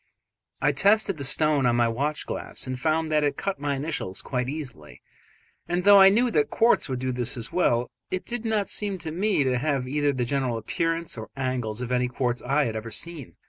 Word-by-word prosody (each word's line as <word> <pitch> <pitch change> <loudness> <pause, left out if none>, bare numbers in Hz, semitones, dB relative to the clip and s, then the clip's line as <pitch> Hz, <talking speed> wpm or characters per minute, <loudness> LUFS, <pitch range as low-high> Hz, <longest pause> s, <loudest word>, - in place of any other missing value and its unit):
I 145 - +4
tested 195 +5 +3
the - - -4
stone 145 -1 +2
on 120 - +2
my 120 -1 +3
watch 140 +6 -2
glass - - -4
and 130 -1 -4
found 155 +2 0
that 150 -1 +3
it 145 - 0
cut 195 -5 -3
my 145 -1 -1
initials 135 - -4
quite 125 -1 -2
easily, 130 - -7 0.7
and 175 +1 -1
though 200 0 +8
I 190 - +9
knew 235 +5 +2
that 150 -7 +2
quartz 230 -8 +3
would 130 - -2
do 130 +1 -2
this 125 +1 -2
as 115 -1 -4
well, 120 -9 +2 0.2
it 185 - -3
did 240 -1 -4
not 220 -3 0
seem 205 -2 -2
to 165 -3 -6
me 190 -2 +1
to 130 -2 +1
have 140 -2 -1
either 145 +2 +1
the 130 -3 -2
general 130 -2 -1
appearance 165 +5 -2
or 110 - -8
angles 125 -4 -2
of 125 0 -4
any 125 0 +2
quartz 125 -1 -1
I 140 +3 +1
had 115 -3 -3
ever 110 +1 -5
seen. 155 +3 -6
140 Hz, 220 wpm, -25 LUFS, 125-165 Hz, 0.7 s, I